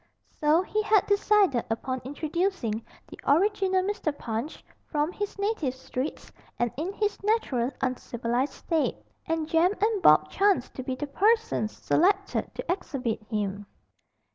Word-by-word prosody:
So 310 +4 +4
he 430 +2 -1
had 425 -2 +3
decided 405 - +3
upon 255 +3 -2
introducing 290 - -2 0.2
the - - -12
original 380 +3 +3
Mr. 395 -5 -1
Punch 230 +6 -5 0.2
from 300 +1 0
his 410 +2 -4
native 400 - -1
streets 260 +2 -5 0.3
and 240 -1 0
in 325 +7 -3
his 420 0 -1
natural 390 - +1
uncivilised 250 0 -1
state, 325 -2 -1 0.3
and 325 -2 -1
Jem 330 +4 +3
and 430 -1 +1
Bob - - +6
chanced 390 -10 +2
to - - -5
be 260 0 -3
the 295 - -3
persons 415 - +1
selected 390 +3 +1
to - - -3
exhibit 265 - -2
him. 205 -2 -2
320 Hz, 140 wpm, -27 LUFS, 255-400 Hz, 0.3 s, Bob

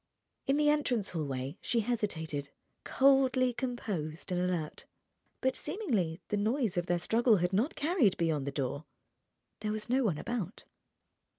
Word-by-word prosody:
In 275 +1 +3
the 300 0 +3
entrance 250 -9 0
hallway 140 -3 -3
she 235 - +1
hesitated, 160 -11 -2 0.3
coldly 260 -2 +4
composed 200 -11 -4
and 180 0 +1
alert. 175 -4 -2 0.6
But 260 0 +1
seemingly 230 - -1
the 210 - +1
noise 220 0 +1
of 175 0 -1
their 175 - +2
struggle 225 +5 +3
had 180 +1 0
not 225 +11 +1
carried 290 - +2
beyond 155 -5 0
the - - -1
door. 140 +2 -3 0.7
There 215 0 -2
was 215 +1 -4
no 265 +1 +3
one 185 -10 +1
about. 220 -3 -4
210 Hz, 150 wpm, -31 LUFS, 165-255 Hz, 0.7 s, coldly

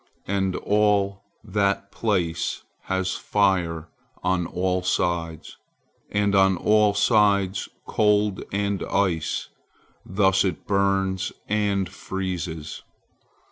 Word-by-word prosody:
And 95 -1 0
all 100 -1 +1 0.2
that 100 -1 0
place 90 -7 -1 0.2
has 95 0 -1
fire 90 -5 0 0.4
on 90 -2 +1
all 90 0 -1
sides, 85 -3 -2 0.5
and 100 0 +1
on 95 -1 +4
all 105 0 +3
sides 100 -3 +2 0.2
cold 105 -2 +2
and 100 0 -1
ice, 90 -5 -1 0.5
thus 95 0 +2
it 95 -5 -2
burns 95 -1 +1 0.2
and 100 -2 +1
freezes. 90 -4 -5
95 Hz, 95 wpm, -24 LUFS, 90-100 Hz, 0.5 s, on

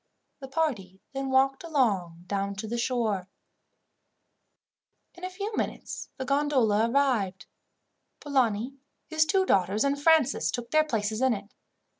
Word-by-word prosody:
The 270 - -8
party 255 - -2
then 270 0 -3
walked 270 +2 +2
along 200 - 0
down 200 +1 -2
to 215 +3 -5
the 235 +2 -2
shore. 225 -7 0 1.9
In 350 - -16
a 370 - -2
few 405 +4 -5
minutes - - -4
the 260 - -4
gondola 255 -6 +2
arrived. 235 -8 +1 0.7
Polani, 255 -3 0 0.3
his 315 -1 +1
two 380 +2 +3
daughters, 195 - +2
and 280 0 0
Francis 310 -4 +4
took 240 -1 -4
their 310 0 +5
places 220 -5 -2
in 260 -3 +3
it. 200 +1 -10
255 Hz, 135 wpm, -28 LUFS, 205-285 Hz, 1.9 s, their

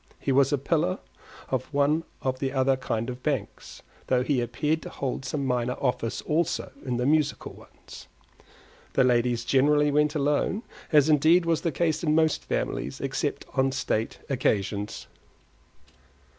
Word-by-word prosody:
He 140 - -2
was 135 0 +4
a 145 - +2
pillar 165 +6 0 0.5
of 130 +1 -2
one 150 +3 +2 0.2
of 130 -1 -1
the 135 -1 -1
other 135 0 +3
kind 115 -3 -3
of 125 0 -6
banks, 135 -9 -4 0.2
though 125 -1 +2
he 130 -2 +1
appeared 150 +7 -1
to - - -8
hold 135 -1 -4
some 140 +2 -2
minor 125 -1 0
office 125 -3 -1
also 160 +1 -1
in 125 -3 -2
the 125 - 0
musical 155 +1 +1
ones. - - -14 0.9
The - - +4
ladies 120 -1 +2
generally 145 +2 +3
went 150 +1 +2
alone; 150 - 0 0.3
as 150 -2 +5
indeed 160 +4 +4
was 165 -2 +1
the 165 - 0
case 160 -1 0
in 155 -2 +2
most 160 -1 +2
families, 70 - -3
except - - -2
on 135 0 +2
state 115 -4 -2
occasions. 105 -6 -1
135 Hz, 155 wpm, -26 LUFS, 125-150 Hz, 0.9 s, as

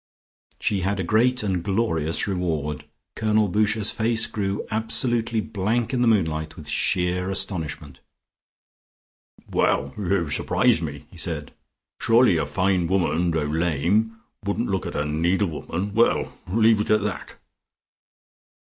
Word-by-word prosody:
She 100 -2 0
had 95 +2 -1
a - - 0
great 120 +6 +2
and 95 -4 0
glorious 90 -6 0
reward. 80 -7 -2 0.3
Colonel 110 -1 +2
Boucher's 105 +2 +1
face 115 0 +1
grew 100 -1 -3
absolutely 115 +1 0
blank 110 +4 -1
in 125 - +1
the 120 - +3
moonlight 80 -8 +1
with 75 - -11
sheer 90 +4 0
astonishment. 80 -6 -4 1.5
"Well, - - +1
you 95 -6 -1
surprise 80 - +2
me," 75 -3 -6
he 90 - -14
said. 80 -4 -4 0.5
"Surely 115 -6 +4
a 80 - -1
fine 95 -2 +1
woman, 90 -2 +1
though 80 -2 0
lame, 85 +8 +1 0.3
wouldn't 105 +4 -1
look 95 -2 -1
at - - -6
a 75 - 0
needle 85 +6 +1
woman 90 +5 -4
well, 115 +2 +2
leave 110 +2 +4
it - - -4
at 110 -1 +3
that." 105 -3 -4
95 Hz, 135 wpm, -24 LUFS, 80-110 Hz, 1.5 s, Surely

